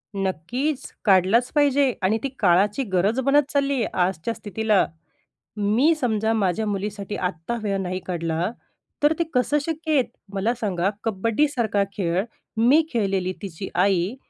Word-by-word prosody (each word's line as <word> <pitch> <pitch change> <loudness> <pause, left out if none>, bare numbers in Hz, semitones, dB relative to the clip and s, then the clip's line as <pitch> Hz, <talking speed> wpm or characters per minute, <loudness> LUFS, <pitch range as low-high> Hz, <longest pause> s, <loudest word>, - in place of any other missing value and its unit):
नक्कीच, 200 - -2 0.2
काढलाच 200 +5 +4
पाहिजे 280 -3 +3
आणि 210 +4 +3
ती 275 - -1
काळाची 200 +6 +3
गरज 200 +8 +2
बनत 280 +2 +3
चालली 280 0 +2
आहे 240 -5 0
आजच्या 180 +4 0
स्थितीला. 215 -1 +1 0.7
मी 225 +11 +3
समजा 225 -5 0
माझ्या 205 0 0
मुलीसाठी 205 0 -3
आत्ता 180 +4 -3
वेळ 200 -1 0
नाही 185 0 -3
काढला, 170 +2 -1 0.5
तर 300 +2 +5
ते - - +3
कसं 255 +4 +2
शक्य 320 -1 -2
आहे. 260 - +4 0.3
मला 205 +5 0
सांगा 190 -2 0
कबड्डीसारखा 225 0 +1
खेळ, 180 0 0 0.3
मी 270 +8 +5
खेळलेली 195 -4 0
तिची 190 -1 -6
आई. 190 +3 +2
210 Hz, 140 wpm, -23 LUFS, 190-255 Hz, 0.7 s, तर